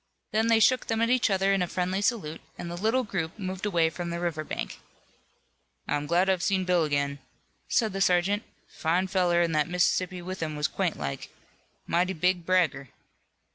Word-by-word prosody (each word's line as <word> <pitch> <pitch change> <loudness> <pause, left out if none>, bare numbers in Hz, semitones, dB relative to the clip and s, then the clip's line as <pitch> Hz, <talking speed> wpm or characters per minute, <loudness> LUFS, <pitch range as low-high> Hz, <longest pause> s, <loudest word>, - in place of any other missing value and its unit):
Then 220 +1 +2
they 230 -1 +5
shook 250 +4 +3
them 225 -1 0
at 230 - +2
each 250 -2 +3
other 195 0 +2
in 195 -2 +2
friendly 185 +2 -1
salute, 200 -8 -1 0.2
and 170 - -6
the - - -4
little 220 +8 +1
group 185 -5 -4
moved 190 0 -4
away 165 -4 +2
from 175 +1 -5
the 170 0 -3
river 170 -3 -2
bank. - - -5 1.1
"I'm 145 0 -1
glad 175 +4 +3
I've 190 -2 +2
seen 190 0 +1
Bill 180 -3 +3
again," 140 -1 -1 0.5
said 220 -5 +1
the 195 - -3
sergeant. 190 +2 +3 0.3
"Fine 175 +4 0
feller 175 -2 +3
an' 170 - 0
that 155 +1 +1
Mississippian 180 0 0
with 185 +1 -5
him 155 -2 -2
was 150 0 0
quaint - - -2
like. 70 -1 -5 0.6
Mighty 180 +3 +1
big 180 0 0
bragger." 160 -8 +1
180 Hz, 185 wpm, -27 LUFS, 165-195 Hz, 1.1 s, they